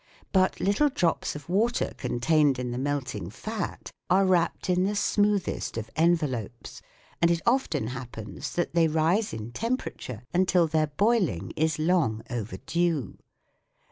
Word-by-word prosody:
But 190 Hz, -1 st, +2 dB
little 205 Hz, +10 st, +3 dB
drops 175 Hz, -, 0 dB
of 145 Hz, -1 st, -9 dB
water 220 Hz, +7 st, +1 dB
contained 135 Hz, +3 st, +2 dB
in 125 Hz, -1 st, -3 dB
the 120 Hz, -, -3 dB
melting 130 Hz, -10 st, -2 dB
fat 215 Hz, -, -5 dB, 0.2 s
are 190 Hz, +2 st, +4 dB
wrapped 180 Hz, -1 st, +1 dB
in 180 Hz, 0 st, +2 dB
the 205 Hz, +2 st, 0 dB
smoothest 205 Hz, -, 0 dB
of 110 Hz, 0 st, -5 dB
envelopes, 150 Hz, -, 0 dB, 0.4 s
and 170 Hz, -, +5 dB
it 170 Hz, -1 st, +2 dB
often 235 Hz, -, +1 dB
happens 120 Hz, -3 st, -6 dB
that 175 Hz, -, -1 dB
they 170 Hz, -1 st, +4 dB
rise 165 Hz, +7 st, +1 dB
in 110 Hz, +1 st, -6 dB
temperature 215 Hz, -, -4 dB
until 180 Hz, -1 st, +3 dB
their 155 Hz, -1 st, +1 dB
boiling 180 Hz, -, +1 dB
is 155 Hz, 0 st, +1 dB
long 155 Hz, -9 st, +1 dB
overdue. 135 Hz, -, -2 dB
160 Hz, 140 wpm, -27 LUFS, 125-185 Hz, 0.4 s, and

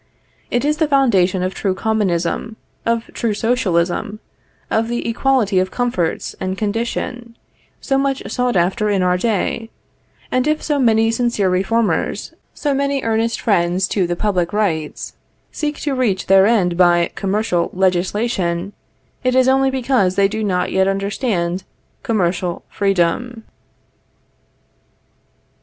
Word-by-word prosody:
It 245 Hz, +3 st, 0 dB
is 300 Hz, +1 st, +1 dB
the 315 Hz, 0 st, +2 dB
foundation 195 Hz, -10 st, +2 dB
of 185 Hz, +1 st, -2 dB
true 190 Hz, -2 st, -1 dB
Commonism, 210 Hz, 0 st, -1 dB, 0.3 s
of 230 Hz, 0 st, +1 dB
true 225 Hz, -3 st, -1 dB
Socialism, 205 Hz, -3 st, 0 dB, 0.5 s
of 225 Hz, +1 st, +1 dB
the 240 Hz, 0 st, -3 dB
equality 230 Hz, -4 st, +2 dB
of 185 Hz, 0 st, 0 dB
comforts 210 Hz, -8 st, -2 dB
and 190 Hz, 0 st, -3 dB
condition, 235 Hz, +3 st, -3 dB, 0.4 s
so 270 Hz, -1 st, +1 dB
much 275 Hz, -1 st, -1 dB
sought 250 Hz, -1 st, -1 dB
after 190 Hz, +5 st, +1 dB
in 195 Hz, -3 st, +1 dB
our 180 Hz, 0 st, +2 dB
day; 225 Hz, +2 st, -1 dB, 0.6 s
and 255 Hz, +2 st, +1 dB
if 305 Hz, 0 st, 0 dB
so 295 Hz, -2 st, 0 dB
many 225 Hz, -3 st, +3 dB
sincere 230 Hz, -5 st, +1 dB
reformers, 200 Hz, +5 st, 0 dB, 0.2 s
so 290 Hz, -2 st, -1 dB
many 280 Hz, 0 st, 0 dB
earnest 225 Hz, +1 st, 0 dB
friends 185 Hz, -3 st, +1 dB
to 190 Hz, -4 st, 0 dB
the 175 Hz, -, -1 dB
public 180 Hz, -3 st, 0 dB
rights, 165 Hz, -8 st, -2 dB, 0.4 s
seek 300 Hz, -1 st, -3 dB
to 290 Hz, -, -1 dB
reach 225 Hz, -8 st, 0 dB
their 195 Hz, +1 st, +5 dB
end 185 Hz, -7 st, +2 dB
by 175 Hz, -1 st, +4 dB
commercial 195 Hz, -3 st, 0 dB
legislation, 185 Hz, 0 st, 0 dB, 0.5 s
it 255 Hz, 0 st, +1 dB
is 260 Hz, 0 st, +4 dB
only 270 Hz, 0 st, +3 dB
because 250 Hz, -8 st, +1 dB
they 200 Hz, 0 st, +4 dB
do 220 Hz, +2 st, -3 dB
not 185 Hz, -3 st, 0 dB
yet 190 Hz, 0 st, +2 dB
understand 195 Hz, -2 st, -1 dB, 0.4 s
commercial 180 Hz, -4 st, -1 dB
freedom. 200 Hz, +5 st, 0 dB
210 Hz, 135 wpm, -19 LUFS, 185-240 Hz, 0.6 s, their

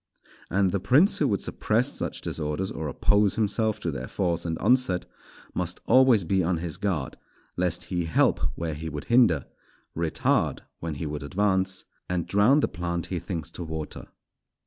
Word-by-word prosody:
And 95 Hz, 0 st, +2 dB
the 100 Hz, -, 0 dB
prince 175 Hz, -, +4 dB
who -, -, +3 dB
would 100 Hz, -3 st, 0 dB
suppress 120 Hz, +6 st, 0 dB
such -, -, -4 dB
disorders 80 Hz, +5 st, -3 dB
or 80 Hz, -1 st, -4 dB
oppose 100 Hz, +6 st, +2 dB
himself 110 Hz, 0 st, 0 dB
to 85 Hz, -, -1 dB
their 65 Hz, -3 st, -5 dB
force 85 Hz, -3 st, -1 dB
and 80 Hz, -1 st, -2 dB
onset, 120 Hz, -5 st, +2 dB, 0.5 s
must 90 Hz, 0 st, -2 dB
always 130 Hz, -6 st, +5 dB
be 95 Hz, +2 st, +1 dB
on 85 Hz, +1 st, +1 dB
his 80 Hz, -1 st, -5 dB
guard, 85 Hz, -10 st, -2 dB, 0.4 s
lest 90 Hz, -1 st, 0 dB
he 90 Hz, -1 st, 0 dB
help 80 Hz, -, +3 dB, 0.2 s
where 80 Hz, -2 st, -3 dB
he 80 Hz, +2 st, -5 dB
would 75 Hz, -2 st, -5 dB
hinder, 110 Hz, -, +5 dB, 0.5 s
retard 85 Hz, -1 st, 0 dB, 0.2 s
when 80 Hz, -2 st, -4 dB
he 75 Hz, -, -4 dB
would 75 Hz, 0 st, -4 dB
advance, 95 Hz, +4 st, 0 dB, 0.2 s
and 90 Hz, -2 st, -1 dB
drown 110 Hz, +9 st, +4 dB
the -, -, +2 dB
plant 85 Hz, -1 st, -3 dB
he 90 Hz, -, 0 dB
thinks 80 Hz, -3 st, -5 dB
to 90 Hz, -, -6 dB
water. 80 Hz, -2 st, -6 dB
90 Hz, 170 wpm, -26 LUFS, 80-100 Hz, 0.5 s, always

